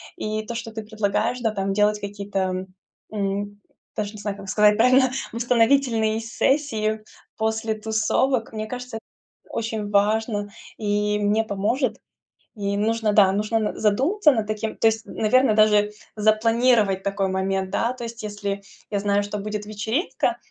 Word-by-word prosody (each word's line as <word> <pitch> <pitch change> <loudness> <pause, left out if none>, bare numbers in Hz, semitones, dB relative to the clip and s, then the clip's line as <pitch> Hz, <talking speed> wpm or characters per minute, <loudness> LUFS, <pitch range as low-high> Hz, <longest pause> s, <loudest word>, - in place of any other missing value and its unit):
И 215 0 -3
то, 235 - -4
что 230 -1 -5
ты 220 - -5
предлагаешь, 215 +3 -1
да, 225 -2 +1
там 195 -2 -2
делать 210 +1 +2
какие-то, 195 -2 -3 0.5
м, 205 0 -3 0.3
даже 210 0 -3
не 210 - -9
знаю, 205 -1 -3
как 195 -1 -9
сказать 210 +1 +4
правильно, 255 +2 +5 0.2
восстановительные 230 -1 +2
сессии 225 -3 0 0.3
после 220 0 -1
тусовок, 220 +3 0
мне 215 -1 -4
кажется, 250 0 -6
эт - - -10 0.5
очень 220 -2 -3
важно 205 0 +1 0.3
и 210 0 0
мне 210 +2 +2
поможет. 220 +4 -1 0.6
И 200 -1 -2
нужно, 220 0 +1
да, 200 -2 +6
нужно 210 +2 0
н 215 -1 -1
задуматься 285 - +3
над 220 -5 0
таким, 215 0 -3
то - - -1
есть, 220 0 0
наверно, 225 +1 +3
даже 210 -1 +4 0.2
запланировать 215 -1 +3
такой 195 -1 -1
момент, 190 0 -1
да, 235 +4 0
то 255 -1 -8
есть 230 0 -7
если 205 -1 -4 0.3
я 205 - 0
знаю, 205 0 +1
что 205 +1 -4
будет 210 +1 -4
вечеринка, 215 - -1
215 Hz, 150 wpm, -23 LUFS, 205-225 Hz, 0.6 s, да